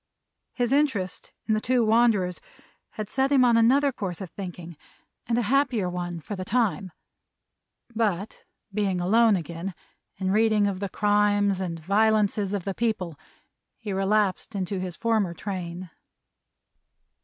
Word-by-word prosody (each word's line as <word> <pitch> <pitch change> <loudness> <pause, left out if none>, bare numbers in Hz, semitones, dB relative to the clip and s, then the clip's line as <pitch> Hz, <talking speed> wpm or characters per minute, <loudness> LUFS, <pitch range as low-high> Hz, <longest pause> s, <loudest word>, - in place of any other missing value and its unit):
His 245 -1 -1
interest 265 -11 0
in 220 - +1
the 215 - +1
two 245 -1 +2
wanderers 215 -5 +2 0.5
had 215 -1 -5
set 265 +5 0
him 265 -3 +5
on 240 -1 +4
another 265 +5 +4
course 190 -8 -5
of 190 -4 -7
thinking, 175 -3 -8 0.5
and 230 0 +1
a 240 - +1
happier 245 -4 +1
one, 175 -1 -4
for 205 - -6
the 185 - -5
time; 200 -3 0 1.0
but 210 -3 -2 0.3
being 195 -3 0
alone 220 +4 +4
again, 170 +2 -5 0.4
and 190 0 0
reading 215 -1 +3
of 195 -2 -1
the 200 -1 -3
crimes 205 -1 +2
and 170 -3 -4
violences 205 +2 +2
of 200 -4 -3
the 195 - -2
people, 185 -9 -2 0.6
he 210 -4 -5
relapsed 195 +1 0
into 190 0 -2
his 185 -2 -5
former 220 -7 0
train. 180 -2 -6
205 Hz, 145 wpm, -26 LUFS, 185-225 Hz, 1.0 s, him